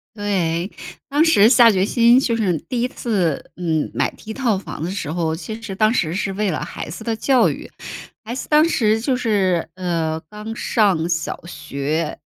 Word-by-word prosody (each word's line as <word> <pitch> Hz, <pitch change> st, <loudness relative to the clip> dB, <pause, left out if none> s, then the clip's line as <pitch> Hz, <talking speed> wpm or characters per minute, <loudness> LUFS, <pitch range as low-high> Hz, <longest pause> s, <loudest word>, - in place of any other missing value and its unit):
对。 185 Hz, -4 st, -1 dB, 0.4 s
当 290 Hz, +3 st, +3 dB
时 225 Hz, -9 st, +6 dB
下 240 Hz, -1 st, +7 dB
决 190 Hz, 0 st, +2 dB
心 235 Hz, +2 st, +5 dB
就 240 Hz, -4 st, 0 dB
是 185 Hz, -7 st, +1 dB
第 240 Hz, -, -4 dB
1 245 Hz, -, +1 dB
次， 195 Hz, -, -2 dB
嗯， 160 Hz, -4 st, -1 dB
买 -, -, +1 dB
第 220 Hz, -, -10 dB
1 -, -, -4 dB
套 235 Hz, -5 st, 0 dB
房 190 Hz, -, -7 dB
的 170 Hz, -, -2 dB
时 180 Hz, -6 st, -4 dB
候， 160 Hz, -1 st, -1 dB
其 220 Hz, +6 st, -7 dB
实 210 Hz, -4 st, -6 dB
当 215 Hz, +2 st, +3 dB
时 165 Hz, -8 st, 0 dB
是 195 Hz, 0 st, -1 dB
为 205 Hz, 0 st, 0 dB
了 155 Hz, -, -3 dB
孩 -, -, -7 dB
子 185 Hz, +8 st, -8 dB
的 230 Hz, -1 st, -1 dB
教 260 Hz, +2 st, +3 dB
育。 -, -, -6 dB, 0.5 s
孩 230 Hz, +2 st, -5 dB
子 260 Hz, -, -5 dB
当 305 Hz, +2 st, +5 dB
时 220 Hz, -7 st, +2 dB
就 255 Hz, +1 st, 0 dB
是， 195 Hz, -8 st, +1 dB
呃， 165 Hz, -3 st, -2 dB
刚 215 Hz, +2 st, -7 dB
上 195 Hz, -11 st, +1 dB
小 165 Hz, -1 st, -3 dB
学， 155 Hz, -1 st, -3 dB
205 Hz, 200 characters per minute, -20 LUFS, 170-230 Hz, 0.5 s, 下